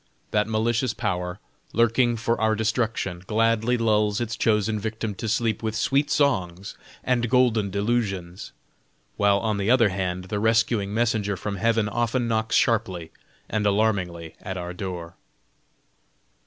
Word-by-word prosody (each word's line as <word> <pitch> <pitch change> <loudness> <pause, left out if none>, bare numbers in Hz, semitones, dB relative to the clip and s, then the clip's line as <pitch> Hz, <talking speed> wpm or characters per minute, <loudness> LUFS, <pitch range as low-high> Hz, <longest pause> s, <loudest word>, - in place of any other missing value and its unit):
That 105 0 +2
malicious 115 +2 0
power, 90 -4 -2 0.4
lurking 115 +1 +3
for 115 +1 -1
our 110 0 +3
destruction, 110 -5 -1
gladly 115 +2 +2
lulls 105 -2 +2
its 115 -2 -2
chosen 110 -1 +1
victim 110 0 -3
to 110 +3 -4
sleep 110 0 0
with 110 -1 -2
sweet 135 +6 +1
songs 95 -10 0 0.3
and 120 -2 +1
golden 115 -5 +3
delusions; 100 -4 -2 0.7
while 100 -1 +4
on 105 +1 -1
the 100 +2 0
other 120 -4 +5
hand 90 -1 -2
the 100 +3 -3
rescuing 110 -2 +2
messenger 110 -3 0
from 100 +2 -4
Heaven 115 +1 +2
often 120 +2 0
knocks 110 0 0
sharply 95 -8 +1 0.4
and 110 -1 -1
alarmingly 95 -6 0
at 95 -2 -5
our 90 0 -5
door. 90 -3 -6
110 Hz, 140 wpm, -24 LUFS, 100-115 Hz, 0.7 s, other